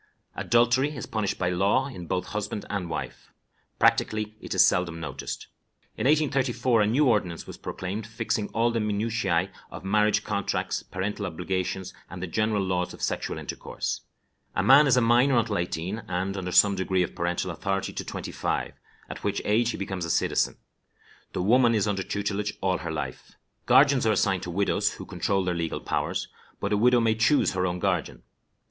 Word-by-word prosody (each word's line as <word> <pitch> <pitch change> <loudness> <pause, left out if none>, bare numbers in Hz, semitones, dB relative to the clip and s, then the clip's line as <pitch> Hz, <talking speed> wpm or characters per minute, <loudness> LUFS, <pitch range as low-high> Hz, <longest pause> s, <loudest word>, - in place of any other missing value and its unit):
Adultery 120 +5 +2
is 130 - -5
punished 110 -3 -2
by 90 -1 0
law 100 +9 +2
in 90 -11 -8
both 90 +1 -1
husband 105 0 -4
and 95 -4 -2
wife. - - -6 0.5
Practically 110 0 +2
it - - -9
is - - +7
seldom 85 -2 +1
noticed. 70 -4 -5 0.5
In - - -3
1834 130 -6 +2
a 105 - +3
new 135 +8 +3
ordinance 100 -8 0
was - - -10
proclaimed 100 +4 -5
fixing 110 -2 -2
all 115 +1 +1
the 115 - 0
minutiæ 105 -4 0 0.2
of - - -9
marriage 105 +1 +2
contracts, 100 -2 -1
parental 100 +2 -4
obligations, 95 +2 -3 0.2
and 90 - -8
the 95 - -3
general 105 +3 0
laws 90 -1 -1
of - - -10
sexual - - -2
intercourse. - - -4 0.5
A - - +1
man 140 +3 +7
is 130 -2 +4
a - - +5
minor 120 +3 +4
until 110 -4 +1
eighteen, 90 +5 -3
and 95 +2 -2
under 90 -2 -4
some 100 +2 +6
degree 95 -1 +1
of 85 - -5
parental 90 +1 -1
authority 95 +3 -2
to - - -4
twenty - - -6
five, - - -2 0.3
at - - -8
which - - 0
age 115 +3 +2
he - - -3
becomes 95 -2 -4
a 85 - -3
citizen. - - +1 0.8
The 90 - -1
woman 120 +3 +4
is 105 -1 +1
under 100 -2 0
tutelage 100 +1 -2
all 95 -1 0
her 85 -3 -4
life. 75 - -5 0.3
Guardians 130 -1 +5
are 110 - +4
assigned 95 -3 +1
to 90 - -6
widows, 100 +3 +1
who - - -9
control 95 -1 0
their 90 -1 0
legal 85 -2 -2
powers, - - -2 0.3
but 100 +1 -1
a - - +3
widow 125 +3 +5
may 115 -1 +3
choose 115 +6 +3
her 90 0 0
own 90 0 -2
guardian. 90 -2 -1
100 Hz, 185 wpm, -26 LUFS, 90-115 Hz, 0.8 s, is